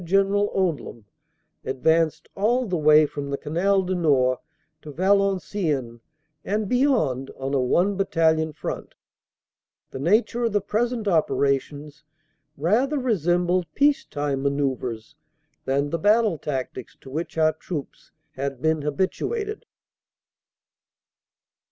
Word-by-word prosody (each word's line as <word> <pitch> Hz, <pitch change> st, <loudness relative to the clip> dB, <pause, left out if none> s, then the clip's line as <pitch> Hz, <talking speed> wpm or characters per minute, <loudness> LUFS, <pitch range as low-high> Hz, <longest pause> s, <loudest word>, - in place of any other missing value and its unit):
General 195 Hz, +3 st, +2 dB
Odium, 165 Hz, -, -2 dB, 0.6 s
advanced 160 Hz, +4 st, +1 dB
all 240 Hz, +6 st, +1 dB
the 185 Hz, -5 st, -2 dB
way 155 Hz, -1 st, +6 dB
from 145 Hz, -1 st, -6 dB
the 140 Hz, -, -2 dB
Canal 190 Hz, +7 st, +1 dB
du 185 Hz, +1 st, -2 dB
Nord 135 Hz, -8 st, +2 dB, 0.4 s
to 150 Hz, -, -9 dB
Valenciennes 185 Hz, -, 0 dB, 0.4 s
and 210 Hz, +1 st, -1 dB
beyond 225 Hz, -, +1 dB
on 135 Hz, +1 st, -4 dB
a 135 Hz, -, +2 dB
one 180 Hz, +10 st, +2 dB
Battalion 160 Hz, -4 st, +2 dB
front -, -, -6 dB, 1.0 s
the -, -, -6 dB
nature 215 Hz, -, +2 dB
of 230 Hz, -, -1 dB
the 205 Hz, -, +3 dB
present 225 Hz, +3 st, -1 dB
operations 145 Hz, -3 st, 0 dB, 0.5 s
rather 230 Hz, -, +1 dB
resembled 180 Hz, -, +1 dB
peace 285 Hz, 0 st, +3 dB
time 145 Hz, -2 st, -3 dB
manoeuvres 135 Hz, -5 st, -2 dB, 0.5 s
than 140 Hz, +2 st, 0 dB
the 165 Hz, -, -1 dB
battle 210 Hz, -2 st, +3 dB
tactics 130 Hz, -3 st, -5 dB
to 130 Hz, -, -12 dB
which 160 Hz, +3 st, -4 dB
our 155 Hz, 0 st, +3 dB
troops 155 Hz, -2 st, -7 dB, 0.2 s
had 135 Hz, -1 st, -4 dB
been 160 Hz, +2 st, +1 dB
habituated. 405 Hz, -, -2 dB
160 Hz, 115 wpm, -24 LUFS, 140-200 Hz, 1.0 s, way